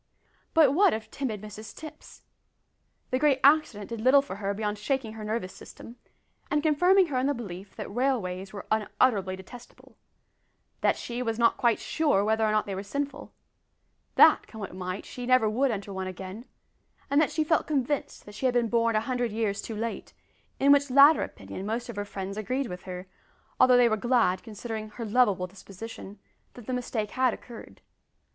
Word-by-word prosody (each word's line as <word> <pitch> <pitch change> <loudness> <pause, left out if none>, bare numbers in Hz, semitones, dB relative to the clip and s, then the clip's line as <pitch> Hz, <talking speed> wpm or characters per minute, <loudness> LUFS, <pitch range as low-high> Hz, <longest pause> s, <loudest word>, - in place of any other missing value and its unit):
But 305 -4 +6
what 385 - +4
of 220 - -8
timid 220 -7 -4
Mrs 215 +1 -9
Tipps? 310 -1 -12 0.9
The 255 - +1
great 285 -2 +3
accident 275 -8 +3
did 230 -2 -5
little 270 +4 +5
for 195 -8 -7
her 200 -1 -2
beyond 210 0 -3
shaking 250 -1 -2
her 220 -1 -8
nervous 215 -3 -3
system, 235 - -12 0.5
and 295 0 +1
confirming 355 +5 +4
her 260 -3 0
in 260 - +1
the 285 - +1
belief 195 -4 -8
that - - -7
railways 195 -8 -1
were 200 - -8
unutterably 210 -2 +1
detestable; 235 +6 -14 0.9
that - - +2
she 240 +1 -5
was 225 -2 -2
not 235 0 +3
quite 235 -3 +2
sure 290 -11 +1
whether 220 +1 +1
or 215 - +2
not 215 0 +1
they 200 - -5
were 190 - -4
sinful; 280 +7 -5 0.8
that, - - +6
come 220 - -11
what 200 - -6
might, 185 +1 -5
she 245 -1 -7
never 255 -3 +4
would 255 +6 +1
enter 200 -3 -4
one 190 0 -4
again; 190 +5 -8 0.7
and 285 +2 +5
that 310 - +2
she 310 - 0
felt 320 +1 +1
convinced 285 -5 -2
she 260 +5 -1
had 250 - +1
been 235 -2 +2
born 230 -1 +2
a 215 - +3
hundred 245 0 -2
years 215 -2 -1
too 225 - -6
late, 225 +2 -5 0.5
in 280 +1 +5
which 285 0 +4
latter 280 +4 +7
opinion 100 - -7
most 230 +4 -3
of 235 - -6
her 205 0 -3
friends 195 0 -6
agreed 255 +6 -2
with 180 -6 -8
her, 180 0 -6 0.5
although 250 -1 +6
they 245 -1 +6
were 220 - +2
glad, 220 -5 +2
considering 220 -1 -6
her 230 +2 -7
loveable 210 -5 +2
disposition, 195 +2 -10 0.4
that 245 - -11
the 255 - -3
mistake 235 -4 -3
had 255 -2 +1
occurred. 235 -2 -13
230 Hz, 190 wpm, -27 LUFS, 205-260 Hz, 0.9 s, latter